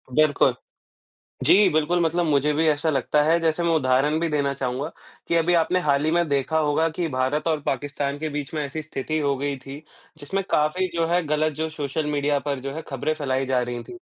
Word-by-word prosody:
बिल्कुल। 145 Hz, -4 st, +3 dB, 0.9 s
जी, 185 Hz, +7 st, +6 dB
बिल्कुल 155 Hz, +3 st, +1 dB
मतलब 170 Hz, +1 st, +1 dB
मुझे 150 Hz, 0 st, +2 dB
भी 160 Hz, +2 st, +1 dB
ऐसा 155 Hz, +1 st, +1 dB
लगता 145 Hz, +2 st, +1 dB
है, 165 Hz, +3 st, +3 dB
जैसे 165 Hz, +1 st, 0 dB
मैं 170 Hz, -, +1 dB
उदाहरण 140 Hz, +2 st, +2 dB
भी 170 Hz, -, 0 dB
देना 140 Hz, -2 st, 0 dB
चाहूँगा 135 Hz, +4 st, -3 dB, 0.4 s
कि 170 Hz, -, +1 dB
अभी 170 Hz, +1 st, +2 dB
आपने 175 Hz, +2 st, +2 dB
हाल 145 Hz, -3 st, +1 dB
ही 155 Hz, -, +2 dB
में 170 Hz, -1 st, +1 dB
देखा 140 Hz, +3 st, +1 dB
होगा 155 Hz, +1 st, +2 dB
कि 165 Hz, +1 st, -3 dB
भारत 140 Hz, +4 st, -1 dB
और 155 Hz, -2 st, 0 dB
पाकिस्तान 140 Hz, +1 st, -2 dB
के 155 Hz, +1 st, -3 dB
बीच 145 Hz, -1 st, -5 dB
में 150 Hz, -, -1 dB
ऐसी 150 Hz, +3 st, -5 dB
स्थिति 155 Hz, +1 st, -3 dB
हो 140 Hz, -2 st, 0 dB
गई 140 Hz, +1 st, -2 dB
थी, 140 Hz, +3 st, -10 dB, 0.4 s
जिसमें 195 Hz, +7 st, -2 dB
काफ़ी 155 Hz, +5 st, +2 dB
जो 165 Hz, -1 st, +1 dB
है 175 Hz, +1 st, +1 dB
गलत 155 Hz, +1 st, +1 dB
जो 160 Hz, +2 st, -2 dB
सोशल 150 Hz, 0 st, -3 dB
मीडिया 145 Hz, 0 st, +1 dB
पर 140 Hz, -2 st, -1 dB
जो 135 Hz, +1 st, -5 dB
है 160 Hz, -, -5 dB
खबरें 140 Hz, +3 st, -1 dB
फैलाई 135 Hz, -3 st, -1 dB
जा 130 Hz, -1 st, +1 dB
रही 120 Hz, -1 st, -4 dB
थी। -, -, -11 dB
150 Hz, 215 wpm, -24 LUFS, 140-160 Hz, 0.9 s, जी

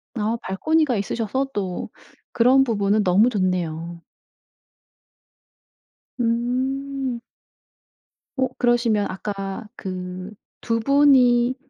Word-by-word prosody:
아 220 Hz, +1 st, -1 dB
발코니가 295 Hz, +6 st, +1 dB
있으셔서 230 Hz, +6 st, -2 dB
또 190 Hz, -3 st, -3 dB, 0.4 s
그런 255 Hz, +3 st, +4 dB
부분은 210 Hz, -3 st, +1 dB
너무 200 Hz, +5 st, +4 dB
좋네요. 175 Hz, -5 st, -2 dB, 2.2 s
음. 255 Hz, +2 st, -1 dB, 1.2 s
어 260 Hz, 0 st, +2 dB
그러시면 235 Hz, -4 st, +2 dB
아까 195 Hz, +2 st, -5 dB
그 185 Hz, 0 st, -6 dB, 0.3 s
2 230 Hz, -1 st, -1 dB
분이 255 Hz, -2 st, +4 dB
230 Hz, 160 characters per minute, -22 LUFS, 195-255 Hz, 2.2 s, 그런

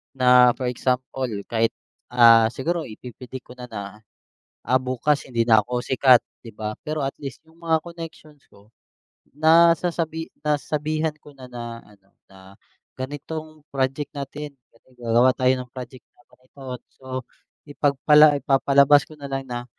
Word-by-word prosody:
na 125 Hz, -1 st, +5 dB
for 130 Hz, -, -3 dB
example 130 Hz, +1 st, -2 dB, 0.2 s
kahit 115 Hz, 0 st, +2 dB, 0.4 s
ah, 115 Hz, -2 st, +7 dB
siguro 160 Hz, +7 st, -3 dB
ipi 120 Hz, +3 st, -10 dB
predict 125 Hz, +2 st, -10 dB
ko -, -, -13 dB
na 125 Hz, 0 st, -8 dB
na 100 Hz, -2 st, -8 dB, 0.7 s
ah, 130 Hz, 0 st, +3 dB
bukas 130 Hz, +3 st, 0 dB
hindi 115 Hz, -2 st, 0 dB
na 110 Hz, -1 st, +6 dB
ako 125 Hz, +2 st, -3 dB
sikat 130 Hz, -1 st, +5 dB, 0.2 s
di 115 Hz, -, -10 dB
ba? 105 Hz, 0 st, -5 dB
Pero 155 Hz, -1 st, -2 dB
at 135 Hz, -, -3 dB
least 140 Hz, +1 st, -8 dB
yung 165 Hz, +1 st, -23 dB
mga 160 Hz, -1 st, +2 dB
connections 165 Hz, -3 st, -10 dB
ko 100 Hz, +2 st, -22 dB, 0.6 s
nasasabi 165 Hz, +1 st, +3 dB, 0.2 s
nasasabihan 150 Hz, +1 st, -1 dB
ko 145 Hz, -, -15 dB
na 130 Hz, -, -11 dB
na 120 Hz, -1 st, -7 dB
ano 100 Hz, -2 st, -23 dB, 0.2 s
na 95 Hz, 0 st, -16 dB, 0.5 s
ganitong 155 Hz, +3 st, -7 dB
project 135 Hz, +1 st, -1 dB
natin 145 Hz, +1 st, -6 dB, 0.2 s
kasi 115 Hz, -, -28 dB
gagawa 120 Hz, +2 st, +3 dB
tayo 130 Hz, 0 st, +3 dB
ng 125 Hz, -1 st, -8 dB
project 130 Hz, 0 st, -10 dB
na -, -, -25 dB
ganito. 130 Hz, +2 st, -22 dB, 0.4 s
So 130 Hz, -, -22 dB, 0.6 s
ipagpala 145 Hz, +1 st, +4 dB
ipapalabas 140 Hz, +1 st, +4 dB
ko 155 Hz, -, -13 dB
na 140 Hz, -1 st, -8 dB
lang 135 Hz, 0 st, -3 dB
na 120 Hz, 0 st, -5 dB
130 Hz, 150 wpm, -23 LUFS, 120-150 Hz, 0.7 s, ah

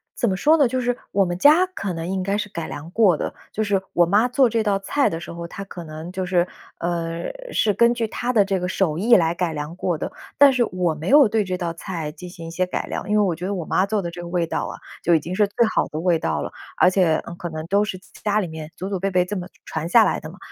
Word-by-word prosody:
怎 235 Hz, -, +1 dB
么 190 Hz, -, -1 dB
说 310 Hz, +9 st, +5 dB
呢？ 285 Hz, -5 st, +4 dB
就 255 Hz, +2 st, -1 dB
是 245 Hz, 0 st, 0 dB, 0.2 s
我 195 Hz, -1 st, +3 dB
们 175 Hz, -1 st, -2 dB
家 310 Hz, -, +6 dB
可 200 Hz, -, -5 dB
能 165 Hz, 0 st, -4 dB
应 190 Hz, +1 st, -1 dB
该 200 Hz, +2 st, 0 dB
是 210 Hz, 0 st, -2 dB
改 170 Hz, -4 st, -5 dB
良 160 Hz, +4 st, -8 dB
过 195 Hz, -7 st, +4 dB
的， -, -, -3 dB, 0.2 s
就 220 Hz, -, -1 dB
是 200 Hz, -2 st, +1 dB
我 175 Hz, -, +5 dB
妈 205 Hz, +7 st, +3 dB
做 250 Hz, +1 st, +4 dB
这 230 Hz, 0 st, 0 dB
道 205 Hz, -2 st, +1 dB
菜 270 Hz, +8 st, +1 dB
的 165 Hz, -, -4 dB
时 170 Hz, -, -8 dB
候， 170 Hz, 0 st, -6 dB
她 195 Hz, -, -7 dB
可 180 Hz, -3 st, -9 dB
能 155 Hz, +2 st, -8 dB
就 185 Hz, 0 st, -3 dB
是， 180 Hz, -1 st, +2 dB, 0.3 s
呃， 170 Hz, -1 st, -2 dB, 0.3 s
是 210 Hz, -2 st, +2 dB
根 235 Hz, +3 st, +4 dB
据 235 Hz, -2 st, -1 dB
她 245 Hz, +3 st, -2 dB
的 210 Hz, -5 st, +4 dB
这 195 Hz, -1 st, 0 dB
个 180 Hz, -, -2 dB
手 175 Hz, -4 st, 0 dB
艺 235 Hz, +4 st, +5 dB
来 165 Hz, -2 st, +3 dB
改 175 Hz, -1 st, -1 dB
良 150 Hz, +1 st, -5 dB
过 175 Hz, -3 st, -1 dB
的。 -, -, -4 dB, 0.3 s
但 280 Hz, -1 st, +7 dB
是 250 Hz, -2 st, +3 dB
我 180 Hz, -4 st, -1 dB
没 155 Hz, +3 st, -5 dB
有 285 Hz, -1 st, +7 dB
对 215 Hz, 0 st, +1 dB
这 185 Hz, -1 st, -3 dB
道 170 Hz, -2 st, -3 dB
菜 165 Hz, -4 st, -5 dB
进 180 Hz, +3 st, -10 dB
行 170 Hz, -2 st, -10 dB
一 -, -, -7 dB
些 180 Hz, +2 st, -1 dB
改 -, -, -3 dB
良， -, -, -5 dB
因 210 Hz, -, +3 dB
为 210 Hz, -, +4 dB
我 185 Hz, -, +1 dB
觉 180 Hz, +3 st, -5 dB
得 200 Hz, -, -2 dB
我 170 Hz, -, -4 dB
妈 185 Hz, -, +2 dB
做 215 Hz, -1 st, 0 dB
的 170 Hz, -3 st, -4 dB
这 175 Hz, -, -8 dB
个 175 Hz, -, -7 dB
味 170 Hz, -1 st, 0 dB
道 -, -, -2 dB
啊， -, -, -7 dB, 0.3 s
就 170 Hz, -, +4 dB
已 -, -, +4 dB
经 175 Hz, +5 st, -5 dB
是 210 Hz, 0 st, +3 dB
最 230 Hz, +4 st, +2 dB
好 -, -, +2 dB
的 155 Hz, -, -5 dB
味 170 Hz, -1 st, +2 dB
道 80 Hz, -, -1 dB
了。 -, -, -5 dB, 0.3 s
而 -, -, +5 dB
且， 180 Hz, -4 st, +3 dB
呃， -, -, -7 dB
可 175 Hz, 0 st, -6 dB
能 155 Hz, 0 st, -6 dB
都 200 Hz, +4 st, +2 dB
是 190 Hz, -3 st, -4 dB, 0.2 s
家 210 Hz, 0 st, +2 dB
里 190 Hz, -, -2 dB
面 160 Hz, -1 st, -8 dB
祖 190 Hz, -, -4 dB
祖 195 Hz, -2 st, -2 dB
辈 195 Hz, -, 0 dB
辈 180 Hz, -1 st, +2 dB
这 205 Hz, +3 st, -4 dB
么 180 Hz, -1 st, -4 dB, 0.2 s
传 160 Hz, +1 st, -4 dB
下 225 Hz, +4 st, +7 dB
来 -, -, +1 dB
的 -, -, -8 dB
嘛， -, -, -13 dB
185 Hz, 320 characters per minute, -22 LUFS, 170-210 Hz, 0.3 s, 但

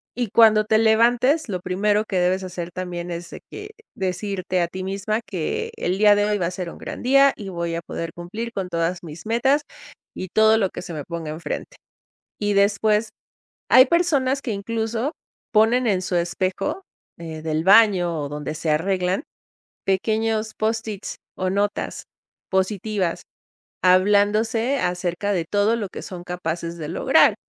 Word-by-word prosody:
y 240 Hz, -2 st, -2 dB
cuando 215 Hz, 0 st, +6 dB
te 215 Hz, +1 st, +2 dB
levantes, 240 Hz, +6 st, +3 dB
lo 185 Hz, -, -2 dB
primero 205 Hz, +4 st, +1 dB
que 190 Hz, -, 0 dB
debes 185 Hz, +2 st, +1 dB
hacer, 180 Hz, -2 st, -5 dB
también, 175 Hz, -1 st, -5 dB
es 170 Hz, 0 st, -6 dB
de -, -, -9 dB
que, 415 Hz, +1 st, -8 dB, 0.2 s
decirte 185 Hz, -1 st, -2 dB
a 170 Hz, -, +1 dB
ti 185 Hz, +2 st, -6 dB
misma 200 Hz, +3 st, -2 dB
que: 175 Hz, -5 st, -3 dB
"El 180 Hz, +2 st, -1 dB
día 210 Hz, 0 st, +6 dB
de 205 Hz, 0 st, +2 dB
hoy 210 Hz, 0 st, +1 dB
va 180 Hz, -, -1 dB
a 170 Hz, -, -2 dB
ser 180 Hz, -1 st, -5 dB
un -, -, -11 dB
gran -, -, -7 dB
día 275 Hz, +2 st, +5 dB
y 200 Hz, -3 st, -7 dB
voy 170 Hz, -2 st, -3 dB
a 170 Hz, -, -3 dB
poder 165 Hz, 0 st, -6 dB
cumplir 215 Hz, +7 st, -6 dB
con 190 Hz, -4 st, -3 dB
todas 170 Hz, +1 st, -1 dB
mis 160 Hz, 0 st, -10 dB
metas, 265 Hz, +6 st, +2 dB, 0.5 s
y 185 Hz, -, -6 dB
todo 220 Hz, +3 st, +5 dB
lo 195 Hz, -4 st, +1 dB
que -, -, -7 dB
se 175 Hz, -, -7 dB
me 150 Hz, -2 st, -5 dB
ponga 165 Hz, -2 st, -5 dB
enfrente", 160 Hz, +2 st, -6 dB, 0.6 s
y 205 Hz, -1 st, 0 dB
después 210 Hz, +2 st, +2 dB, 0.6 s
hay 255 Hz, +1 st, +8 dB
personas 280 Hz, -5 st, +1 dB
que, 235 Hz, -, -3 dB
incluso, 225 Hz, -, -2 dB, 0.4 s
ponen 230 Hz, +3 st, +4 dB
en 190 Hz, -3 st, +1 dB
su 185 Hz, -, -3 dB
espejo, 185 Hz, -, -1 dB, 0.4 s
eh, 160 Hz, -2 st, -7 dB
del 160 Hz, 0 st, -1 dB
baño 190 Hz, -5 st, +5 dB
o 145 Hz, -, -4 dB
donde 150 Hz, +1 st, -5 dB
se 155 Hz, 0 st, -2 dB
arreglan, 185 Hz, -, 0 dB, 0.6 s
pequeños 220 Hz, +2 st, 0 dB
post-its 220 Hz, -2 st, -2 dB, 0.2 s
o 185 Hz, -, -1 dB
notas, 200 Hz, +2 st, -2 dB, 0.5 s
positivas, 190 Hz, -1 st, -1 dB, 0.6 s
hablándose 210 Hz, +7 st, +3 dB
acerca 180 Hz, +2 st, -1 dB
de 175 Hz, -4 st, 0 dB
todo 205 Hz, +5 st, +2 dB
lo 210 Hz, -4 st, -4 dB
que -, -, -8 dB
son 180 Hz, -2 st, -8 dB
capaces 170 Hz, -1 st, -4 dB
de 150 Hz, -, -5 dB
lograr. 170 Hz, -, +4 dB
195 Hz, 170 wpm, -23 LUFS, 175-220 Hz, 0.6 s, hay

